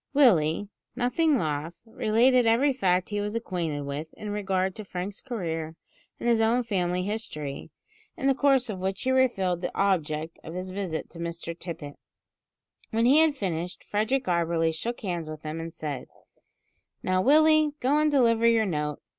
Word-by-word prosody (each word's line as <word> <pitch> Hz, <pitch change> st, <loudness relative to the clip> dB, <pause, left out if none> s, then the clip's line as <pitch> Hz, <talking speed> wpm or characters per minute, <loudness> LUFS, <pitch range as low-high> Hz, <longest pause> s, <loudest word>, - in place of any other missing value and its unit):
Willie, 200 Hz, -, +4 dB, 0.3 s
nothing 265 Hz, +5 st, +2 dB
loth, 155 Hz, -1 st, -2 dB
related 230 Hz, +3 st, +3 dB
every 260 Hz, +5 st, +4 dB
fact 185 Hz, -7 st, +1 dB
he 205 Hz, -1 st, -1 dB
was 210 Hz, +2 st, -3 dB
acquainted 175 Hz, -10 st, -2 dB
with 145 Hz, +3 st, -5 dB
in 210 Hz, -1 st, -6 dB
regard 190 Hz, -2 st, 0 dB
to 215 Hz, -, -8 dB
Frank's 190 Hz, +1 st, -5 dB
career, 165 Hz, -10 st, -4 dB, 0.4 s
and -, -, -3 dB
his 230 Hz, -1 st, +4 dB
own 235 Hz, +3 st, +3 dB
family 180 Hz, -5 st, -1 dB
history, 165 Hz, -9 st, -5 dB, 0.5 s
in -, -, -4 dB
the 275 Hz, -, +5 dB
course 270 Hz, -2 st, +3 dB
of 195 Hz, -4 st, -5 dB
which 190 Hz, +1 st, -2 dB
he 260 Hz, -, +1 dB
revealed 195 Hz, -9 st, +2 dB
the -, -, -1 dB
object 160 Hz, -5 st, 0 dB
of 165 Hz, -, -8 dB
his 185 Hz, +1 st, -5 dB
visit 185 Hz, -4 st, -3 dB
to 170 Hz, -, -11 dB
Mr 170 Hz, 0 st, -5 dB
Tippet. 165 Hz, -4 st, -7 dB, 0.9 s
When 225 Hz, +1 st, +1 dB
he 275 Hz, +5 st, +6 dB
had 320 Hz, -2 st, +4 dB
finished, 180 Hz, -, -3 dB
Frederick 235 Hz, +6 st, 0 dB
Auberly 170 Hz, -2 st, +1 dB
shook 230 Hz, +10 st, -4 dB
hands 175 Hz, -6 st, -3 dB
with 155 Hz, -1 st, -8 dB
him 155 Hz, +1 st, -4 dB
and 165 Hz, 0 st, -5 dB
said: 150 Hz, -5 st, -5 dB, 1.0 s
"Now, 185 Hz, 0 st, +2 dB
Willie, 310 Hz, +3 st, +5 dB
go 275 Hz, +4 st, +2 dB
and 305 Hz, 0 st, +3 dB
deliver 230 Hz, -5 st, +4 dB
your 230 Hz, -1 st, +4 dB
note. 150 Hz, -5 st, -3 dB
195 Hz, 170 wpm, -27 LUFS, 165-240 Hz, 1.0 s, he